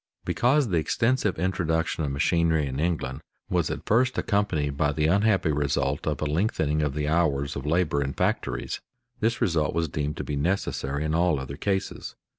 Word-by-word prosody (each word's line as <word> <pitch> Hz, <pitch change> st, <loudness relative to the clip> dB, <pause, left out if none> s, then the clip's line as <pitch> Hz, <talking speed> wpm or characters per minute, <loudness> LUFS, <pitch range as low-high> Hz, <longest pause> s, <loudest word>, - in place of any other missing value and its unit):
Because 130 Hz, +1 st, +2 dB
the 90 Hz, -, +1 dB
extensive 115 Hz, +4 st, +1 dB
introduction 80 Hz, -2 st, 0 dB
of 75 Hz, -, -1 dB
machinery 80 Hz, +2 st, +2 dB
in 65 Hz, 0 st, -4 dB
England 75 Hz, -4 st, -1 dB, 0.3 s
was -, -, +1 dB
at -, -, -5 dB
first 125 Hz, +4 st, +2 dB
accompanied 90 Hz, -8 st, 0 dB
by 75 Hz, +1 st, +1 dB
the 75 Hz, +1 st, 0 dB
unhappy 95 Hz, -1 st, +3 dB
result 70 Hz, 0 st, 0 dB
of 75 Hz, -, 0 dB
a -, -, 0 dB
lengthening 75 Hz, -2 st, 0 dB
of 75 Hz, -2 st, -1 dB
the 75 Hz, 0 st, -1 dB
hours 75 Hz, -4 st, +1 dB
of 70 Hz, +1 st, -5 dB
labor 80 Hz, -3 st, +1 dB
in 70 Hz, 0 st, -2 dB
factories, -, -, -1 dB, 0.4 s
this 115 Hz, +2 st, 0 dB
result 80 Hz, -3 st, +1 dB
was 85 Hz, 0 st, +1 dB
deemed 75 Hz, +1 st, -3 dB
to -, -, -3 dB
be 75 Hz, -, -3 dB
necessary 70 Hz, -3 st, -1 dB
in 75 Hz, -, -1 dB
all 85 Hz, -3 st, +2 dB
other 65 Hz, +1 st, -6 dB
cases. 95 Hz, +4 st, -3 dB
80 Hz, 180 wpm, -26 LUFS, 70-90 Hz, 0.4 s, unhappy